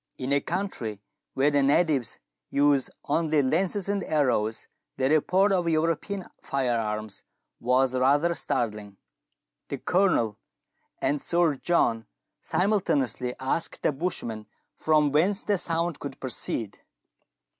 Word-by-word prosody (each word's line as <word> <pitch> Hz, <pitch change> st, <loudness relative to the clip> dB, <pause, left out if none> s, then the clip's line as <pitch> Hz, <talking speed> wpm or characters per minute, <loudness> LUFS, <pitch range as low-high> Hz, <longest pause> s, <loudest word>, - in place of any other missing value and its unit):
In 130 Hz, +1 st, -2 dB
a 140 Hz, -, +3 dB
country 160 Hz, -, -3 dB, 0.4 s
where 140 Hz, +3 st, +3 dB
the 145 Hz, -1 st, +3 dB
natives 140 Hz, -2 st, +2 dB, 0.3 s
use 140 Hz, -2 st, +3 dB, 0.2 s
only 155 Hz, -1 st, +1 dB
lances 185 Hz, +8 st, 0 dB
and 200 Hz, -1 st, 0 dB
arrows 115 Hz, -7 st, 0 dB, 0.3 s
the 130 Hz, +1 st, +1 dB
report 185 Hz, +6 st, +3 dB
of 180 Hz, -3 st, +1 dB
European 165 Hz, +4 st, -1 dB, 0.2 s
fire 130 Hz, -3 st, 0 dB
arms 105 Hz, -1 st, -4 dB, 0.4 s
was 130 Hz, +2 st, +2 dB
rather 145 Hz, +6 st, +3 dB
startling. 105 Hz, -9 st, -2 dB, 0.7 s
The -, -, -4 dB
Colonel 175 Hz, -, +1 dB, 0.6 s
and 145 Hz, 0 st, +1 dB
Sir 170 Hz, -3 st, +2 dB
John 125 Hz, -6 st, +1 dB, 0.3 s
simultaneously 140 Hz, -, 0 dB
asked 130 Hz, +5 st, -2 dB
the -, -, +3 dB
bushman 135 Hz, -9 st, -4 dB, 0.3 s
from 150 Hz, -2 st, +2 dB
whence 190 Hz, +8 st, +2 dB
the 205 Hz, -3 st, +1 dB
sound 165 Hz, -1 st, -1 dB
could 140 Hz, -2 st, -7 dB
proceed. 115 Hz, -5 st, -3 dB
145 Hz, 120 wpm, -26 LUFS, 125-170 Hz, 0.7 s, a